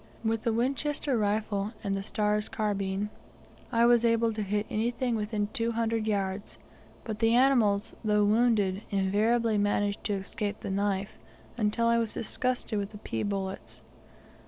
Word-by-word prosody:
With 225 0 0
the 230 - 0
Winchester 270 +4 0
rifle, 210 -1 0
and 195 -1 -1
the 195 - -2
Starr's 210 +1 0
carbine, 205 -1 -1 0.6
I 230 0 +4
was 240 -1 +5
able 230 -1 +3
to 215 - -3
hit 205 +1 -1
anything 235 +2 -1
within 210 -1 -1
two 230 0 0
hundred 225 -1 0
yards, 200 -1 -2 0.5
but 215 -2 -5
the 225 0 +4
animals, 235 -6 +3
though 210 -1 +3
wounded, 210 -3 +2
invariably 210 +3 +2
managed 205 0 0
to 210 - 0
escape 200 +1 -3
the 200 - -4
knife, 200 0 -1 0.4
until 225 0 +1
I 235 0 +4
was 225 -2 -2
disgusted 245 -2 -1
with 200 +1 -5
the - - -7
pea 115 - -4
bullets. 195 -1 -4
215 Hz, 155 wpm, -29 LUFS, 205-230 Hz, 0.6 s, was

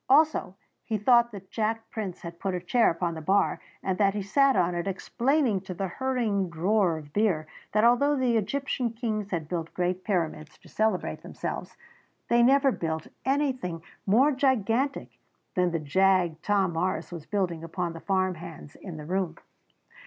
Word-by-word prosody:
Also, 295 -9 +4 0.3
he 220 - -1
thought 235 +3 +4
that 195 -3 -11
Jack 225 0 -1
Prince 205 -6 -5
had 170 0 -8
put 190 -2 -2
a - - -1
chair 230 +7 +3
upon 170 0 -1
the 160 - -6
bar 195 +6 +2 0.2
and 190 0 -1
that 200 -1 +3
he 205 - -2
sat 275 +7 +3
on 175 0 +2
it 175 +2 -2
explaining 240 +3 +1
to 185 -1 -7
the 195 +2 -2
hurrying 225 -5 0
drawer 175 +1 +2
of 145 -1 -11
beer 195 -8 +1 0.3
that 215 +1 +2
although 245 +5 +4
the 255 -3 +1
Egyptian 245 +3 -1
kings 215 -3 -3
had 165 -5 -3
built 165 -1 -4
great 180 +1 -1
pyramids 165 -5 -2
to - - -19
celebrate 215 -4 -1
themselves - - -6 0.5
they 235 0 +5
never 270 +2 +5
built 160 -6 -3 0.2
anything 260 - 0 0.2
more 250 +9 +5
gigantic 260 0 0 0.3
than 180 -1 +2
the 170 - -1
jag 175 +1 +2
Tom 195 -4 +1
Morris 170 0 -1
was 165 -3 -8
building 180 -5 -1
among 170 +1 -3
the 165 - -8
farm 185 0 +1
hands 160 -3 -10
in 180 -5 -8
the 150 - -8
room. 185 +1 -1
195 Hz, 175 wpm, -27 LUFS, 175-235 Hz, 0.5 s, they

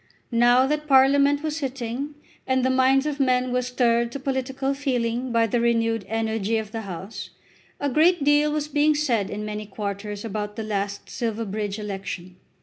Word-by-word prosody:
Now 240 +2 +5
that 300 +2 -1
Parliament 280 +1 +5
was 310 -1 -2
sitting, 270 0 -4 0.3
and 260 -1 +2
the 260 - +3
minds 260 +1 +3
of 300 -1 -2
men 255 -2 +2
were 250 - +2
stirred 235 -1 +1
to 280 - -4
political 265 0 -2
feeling 250 -3 -1
by 230 -1 +3
the 230 +2 0
renewed 230 -3 +1
energy 225 -1 0
of 215 -1 -4
the 225 0 -4
House, 195 +1 -7 0.5
a 285 - 0
great 315 +4 +3
deal 295 +1 +4
was 300 0 -1
being 300 +1 +3
said 235 -10 0
in 210 +1 -4
many 210 0 -5
quarters 205 +1 -5
about 210 -1 -4
the 225 - -4
last 200 -1 -3
Silverbridge 215 -3 -3
election. 195 -3 -6
240 Hz, 170 wpm, -24 LUFS, 215-275 Hz, 0.5 s, Now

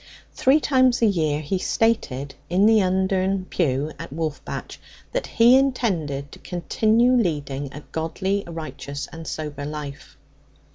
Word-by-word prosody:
Three 270 +4 +4
times 260 -4 +3
a - - +7
year 155 -7 +1
he 170 +5 -2
stated 145 - 0 0.2
in 185 +4 +3
the 220 -1 +6
Undern 190 0 +1
pew 145 -2 0
at - - -7
Wolfbatch 155 0 -5 0.3
that - - -2
he 235 +2 +6
intended 175 - 0
to - - -12
continue 220 +7 +2
leading 145 - -1
a 145 - -8
godly, 190 +5 -1
righteous, 155 -3 -6
and 165 -1 -8
sober 150 -2 -5
life. 145 -1 -7
175 Hz, 135 wpm, -23 LUFS, 150-220 Hz, 0.3 s, a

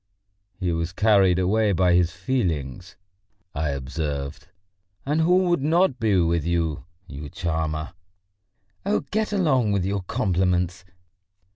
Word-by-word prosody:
"He 90 -3 -1
was 85 +2 -2
carried 100 -4 +4
away 100 +3 +2
by 90 0 +3
his 85 -1 +3
feelings!" 90 - -3 0.6
I 75 +1 -1
observed. 70 +1 -4 0.6
"And 150 +3 +1
who 180 +3 +4
would 175 -5 +1
not 160 -2 +2
be 110 -4 +2
with 85 -2 +1
you, 85 -2 -1 0.2
you 70 -1 -8
charmer?" 80 -1 -3 0.9
"Oh, 205 +2 +1
get 215 0 0
along 135 - +2
with 95 -3 0
your 100 0 -1
compliments! 90 0 0
90 Hz, 125 wpm, -24 LUFS, 80-110 Hz, 0.9 s, carried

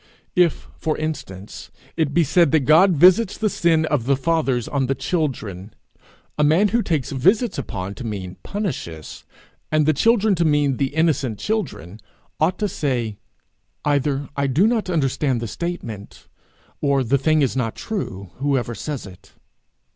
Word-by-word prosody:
If, 180 -4 +2
for 155 - -1
instance, 105 -11 -6 0.3
it 160 -4 0
be 170 +4 +3
said 165 0 +3
that 160 - +5
God 160 +8 +5
visits 185 +7 +5
the 215 -2 0
sins 165 -2 +2
of 140 -6 +1
the 140 - +4
fathers 135 -6 0
on 135 -3 -1
the 135 - 0
children, 115 - -3 0.6
a - - +4
man 165 +8 +4
who 235 +3 +2
takes 155 - -1
visits 190 - +2
upon 95 +1 -5
to 125 - -8
mean 95 -5 -5
punishes, 130 - -5 0.5
and 155 -1 +3
the 155 - +4
children 220 - +3
to 175 -2 +1
mean 145 -4 +2
the 140 +1 -2
innocent 145 -8 +1
children, 140 - -3 0.4
ought 175 +4 +2
to 210 - 0
say, 120 - -2 0.7
'Either 145 -1 0
I 140 0 0
do 145 +9 +3
not 225 -4 +1
understand 135 -5 0
the 115 - -4
statement, 115 - -6 0.5
or 140 -2 +2
the 135 +3 +1
thing 155 +2 +3
is 130 - 0
not 115 -4 -1
true, 100 - -5
whoever 135 -4 0
says 140 +5 -5
it.' 95 0 -14
145 Hz, 160 wpm, -21 LUFS, 125-170 Hz, 0.7 s, that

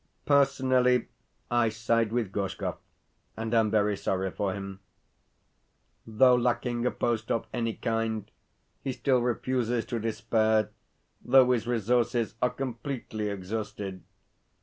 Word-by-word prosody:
Personally 130 -3 +3 0.4
I 120 -1 +3
side 115 0 0
with 115 -5 -1
Gorshkov, 100 -1 -3 0.6
and 110 +1 -3
am 110 -2 +4
very 105 -1 +2
sorry 95 -1 -1
for 100 +1 -1
him. 95 0 -6 1.3
Though 125 +3 +5
lacking 120 0 +1
a - - +4
post 115 -2 -1
of 115 - 0
any 115 -2 -1
kind, 115 -2 -2 0.5
he 135 - -2
still 125 0 +2
refuses 120 -1 0
to 120 - -3
despair, 110 -1 +1 0.5
though 130 0 +6
his 120 -2 0
resources 120 0 +1
are 125 - +3
completely 125 -4 -4
exhausted. 100 -1 -5
115 Hz, 120 wpm, -28 LUFS, 110-125 Hz, 1.3 s, though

